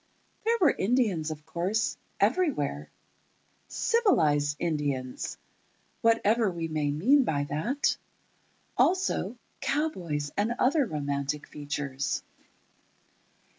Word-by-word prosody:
There 460 Hz, +1 st, +3 dB
were 340 Hz, -7 st, +6 dB
Indians, 195 Hz, -8 st, +1 dB
of 155 Hz, -1 st, -7 dB
course, 190 Hz, +6 st, -1 dB, 0.2 s
everywhere—"civilized 150 Hz, -, 0 dB
Indians," 145 Hz, -6 st, -2 dB, 0.6 s
whatever 230 Hz, -1 st, +3 dB
we 170 Hz, -2 st, -3 dB
may 155 Hz, -2 st, -1 dB
mean 240 Hz, -, +4 dB
by 145 Hz, -, 0 dB
that; 155 Hz, -, 0 dB, 0.8 s
also, 355 Hz, -, +1 dB, 0.2 s
cowboys 170 Hz, -, -1 dB
and 220 Hz, +4 st, 0 dB
other 275 Hz, +1 st, +3 dB
romantic 145 Hz, -2 st, -2 dB
features. 145 Hz, -2 st, -3 dB
170 Hz, 85 wpm, -28 LUFS, -, 0.8 s, were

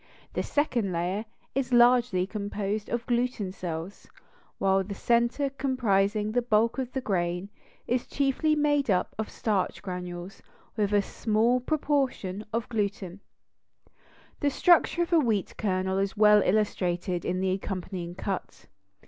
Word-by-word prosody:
The -, -, 0 dB
second 245 Hz, -9 st, 0 dB
layer 180 Hz, +5 st, -2 dB, 0.3 s
is 265 Hz, -1 st, -1 dB
largely 240 Hz, -6 st, +4 dB
composed 205 Hz, 0 st, -3 dB
of 240 Hz, 0 st, -2 dB
gluten 240 Hz, -5 st, -1 dB
cells; 175 Hz, 0 st, -6 dB, 0.5 s
while 195 Hz, 0 st, +2 dB
the 200 Hz, +1 st, -6 dB
center 240 Hz, +6 st, +1 dB
comprising 215 Hz, -6 st, +1 dB
the 245 Hz, +2 st, +2 dB
bulk 230 Hz, +1 st, +2 dB
of 255 Hz, -1 st, -3 dB
the 265 Hz, -, -2 dB
grain, 180 Hz, -3 st, -1 dB, 0.4 s
is 245 Hz, +1 st, -1 dB
chiefly 280 Hz, +3 st, +1 dB
made 290 Hz, -3 st, +2 dB
up 185 Hz, -2 st, +1 dB
of 220 Hz, -, -2 dB
starch 205 Hz, -5 st, -1 dB
granules 180 Hz, -1 st, -6 dB, 0.3 s
with 210 Hz, -2 st, 0 dB
a 205 Hz, -1 st, +3 dB
small 225 Hz, +5 st, +1 dB
proportion 260 Hz, -8 st, -1 dB
of 230 Hz, +1 st, -2 dB
gluten. 200 Hz, -4 st, -3 dB, 1.2 s
The 290 Hz, -, +2 dB
structure 345 Hz, +3 st, +4 dB
of 345 Hz, -, -4 dB
a 335 Hz, -, +6 dB
wheat 220 Hz, -, 0 dB
kernel 190 Hz, -2 st, 0 dB
is 195 Hz, +2 st, -2 dB
well 210 Hz, 0 st, +6 dB
illustrated 180 Hz, -3 st, 0 dB
in 185 Hz, -, -1 dB
the 190 Hz, 0 st, +1 dB
accompanying 185 Hz, -2 st, -4 dB
cut. 195 Hz, 0 st, -5 dB
210 Hz, 140 wpm, -27 LUFS, 190-245 Hz, 1.2 s, a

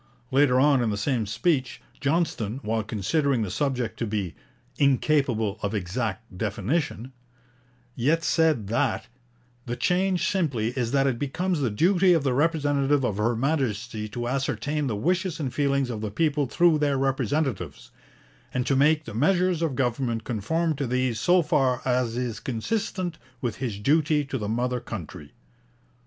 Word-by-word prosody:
Later 130 Hz, -1 st, +4 dB
on 140 Hz, -1 st, +4 dB
in 115 Hz, -, +1 dB
the 105 Hz, -, -1 dB
same 115 Hz, 0 st, 0 dB
speech, 130 Hz, -, 0 dB, 0.2 s
Johnston, 140 Hz, -, 0 dB
while 110 Hz, +1 st, 0 dB
considering 120 Hz, -, 0 dB
the 95 Hz, -, -4 dB
subject 130 Hz, -2 st, -2 dB
to 115 Hz, -, -1 dB
be 100 Hz, -6 st, -2 dB, 0.5 s
'incapable 130 Hz, -6 st, +2 dB
of 100 Hz, +1 st, -2 dB
exact 105 Hz, +2 st, -3 dB
definition,' 115 Hz, -, -2 dB, 0.8 s
yet 155 Hz, +7 st, +1 dB
said 160 Hz, -9 st, +2 dB
that 120 Hz, +2 st, 0 dB, 0.6 s
'the 120 Hz, -, -2 dB
change 185 Hz, +3 st, +1 dB
simply 140 Hz, -, 0 dB
is 125 Hz, -2 st, -2 dB
that 135 Hz, 0 st, +3 dB
it 130 Hz, -4 st, 0 dB
becomes 175 Hz, +5 st, -1 dB
the 130 Hz, -4 st, +1 dB
duty 180 Hz, -, +4 dB
of 165 Hz, -4 st, +2 dB
the 135 Hz, -3 st, +1 dB
representative 145 Hz, -1 st, +2 dB
of 105 Hz, -5 st, -1 dB
Her 115 Hz, +3 st, +1 dB
Majesty 120 Hz, -5 st, -1 dB
to 120 Hz, +2 st, -4 dB
ascertain 140 Hz, +3 st, -1 dB
the 115 Hz, -, -1 dB
wishes 180 Hz, -, 0 dB
and 135 Hz, -5 st, -3 dB
feelings 140 Hz, -3 st, +1 dB
of 110 Hz, -3 st, -5 dB
the 110 Hz, -, -2 dB
people 145 Hz, +4 st, 0 dB
through 170 Hz, +2 st, +3 dB
their 145 Hz, -2 st, +1 dB
representatives, 135 Hz, -, -1 dB, 0.6 s
and 125 Hz, -1 st, -1 dB
to 135 Hz, -, +2 dB
make 150 Hz, +3 st, +3 dB
the 115 Hz, -, -7 dB
measures 175 Hz, -, +2 dB
of 160 Hz, -6 st, 0 dB
government 120 Hz, -3 st, -1 dB
conform 155 Hz, +10 st, -1 dB
to 140 Hz, -, -2 dB
these 125 Hz, -2 st, 0 dB
so 180 Hz, 0 st, +4 dB
far 130 Hz, -4 st, +2 dB
as 125 Hz, -2 st, 0 dB
is 125 Hz, -3 st, -3 dB
consistent 175 Hz, -, -3 dB, 0.2 s
with 120 Hz, -3 st, -3 dB
his 120 Hz, -6 st, -3 dB
duty 150 Hz, +6 st, +2 dB
to 135 Hz, -1 st, -4 dB
the 105 Hz, -1 st, -3 dB
mother 125 Hz, +2 st, 0 dB
country.' 80 Hz, -10 st, -8 dB
130 Hz, 160 wpm, -26 LUFS, 115-150 Hz, 0.8 s, Later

